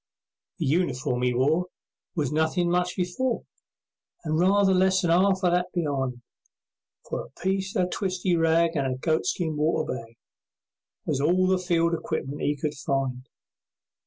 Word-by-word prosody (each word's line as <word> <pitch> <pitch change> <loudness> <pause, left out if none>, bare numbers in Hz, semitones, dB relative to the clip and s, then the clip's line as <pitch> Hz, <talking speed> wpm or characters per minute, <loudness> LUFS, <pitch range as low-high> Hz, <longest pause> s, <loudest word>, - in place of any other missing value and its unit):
The - - -2
uniform 130 -5 0
'e 125 0 +2
wore 155 +8 +2 0.5
Was 150 -6 -1
nothin' 160 +3 +1
much 180 0 0
before, 210 +8 -1 0.8
And 155 -1 0
rather 195 +2 +4
less 190 0 +3
than 170 - +2
'arf 190 +2 +3
o' 180 - +4
that 180 +1 0
be'ind, 135 -7 -2 0.8
For - - -3
a - - -14
piece 190 +1 -1
o' 185 - +3
twisty 185 -1 -1
rag 165 0 +2
And 135 -3 0
a - - -9
goatskin 160 +2 0
water 155 -1 0
bag 115 -2 -9 0.9
Was 135 - -1
all 180 +5 +3
the 185 0 +2
field 170 -2 +1
equipment 145 -3 -3
'e 145 - +1
could 150 +1 -3
find. 135 -3 -2
165 Hz, 150 wpm, -26 LUFS, 140-180 Hz, 0.9 s, rather